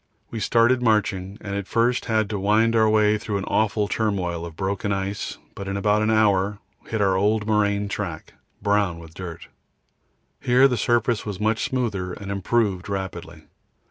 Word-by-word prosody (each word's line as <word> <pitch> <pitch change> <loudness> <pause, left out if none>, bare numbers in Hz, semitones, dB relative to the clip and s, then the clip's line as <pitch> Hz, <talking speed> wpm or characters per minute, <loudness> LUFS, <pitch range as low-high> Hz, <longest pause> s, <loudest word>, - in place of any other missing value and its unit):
We 115 - -4
started 120 +3 +3
marching, 105 -4 0
and 100 -2 -5
at 100 -1 -4
first 120 +2 +1
had 110 -3 +1
to 105 - -2
wind 110 +4 +3
our 110 -1 +4
way 105 0 +3
through 105 -1 -3
an 95 - -3
awful 105 0 +1
turmoil 90 -6 -1
of 80 - -11
broken 100 +2 -2
ice, 100 +1 -3 0.2
but 100 - -7
in 100 0 -2
about 105 +1 +2
an 110 - +1
hour 105 -2 +2 0.3
we - - -19
hit 110 -1 -1
an 100 - +4
old 105 +3 +1
moraine 105 -1 +1
track, 100 -5 -5 0.3
brown 100 -4 +1
with 80 -1 -12
dirt. 90 -2 -8 0.9
Here 125 +2 +5
the 125 - 0
surface 120 0 +1
was 100 -3 -5
much 110 +1 +1
smoother 105 -8 -2
and 100 -1 -7
improved 100 -1 0
rapidly. 85 -5 -5
105 Hz, 175 wpm, -23 LUFS, 95-110 Hz, 0.9 s, Here